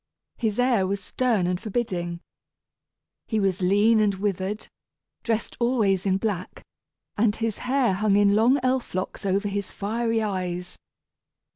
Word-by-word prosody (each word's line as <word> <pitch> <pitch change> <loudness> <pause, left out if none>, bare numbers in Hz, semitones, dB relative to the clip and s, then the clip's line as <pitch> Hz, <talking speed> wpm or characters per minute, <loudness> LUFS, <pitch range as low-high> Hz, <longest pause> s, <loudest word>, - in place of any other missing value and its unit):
His 220 -3 -1
air 245 -6 +2
was 200 +1 -1
stern 230 -7 +1
and 180 +1 -1
forbidding. 185 -7 -3 1.1
He 220 - 0
was 195 -1 0
lean 205 +5 +4
and 205 -2 +2
withered, 195 +1 -2 0.5
dressed 225 -1 -2
always 215 -6 +2
in 190 0 +3
black, 195 -3 -4 0.6
and 215 -1 +3
his 225 -2 -2
hair 260 -6 +3
hung 200 +1 +2
in 200 0 +4
long 235 +6 +4
elf 255 -5 0
locks 185 +1 -3
over 200 +2 +1
his 200 -1 -3
fiery 225 +2 -1
eyes. 180 -3 -3
205 Hz, 140 wpm, -25 LUFS, 190-225 Hz, 1.1 s, lean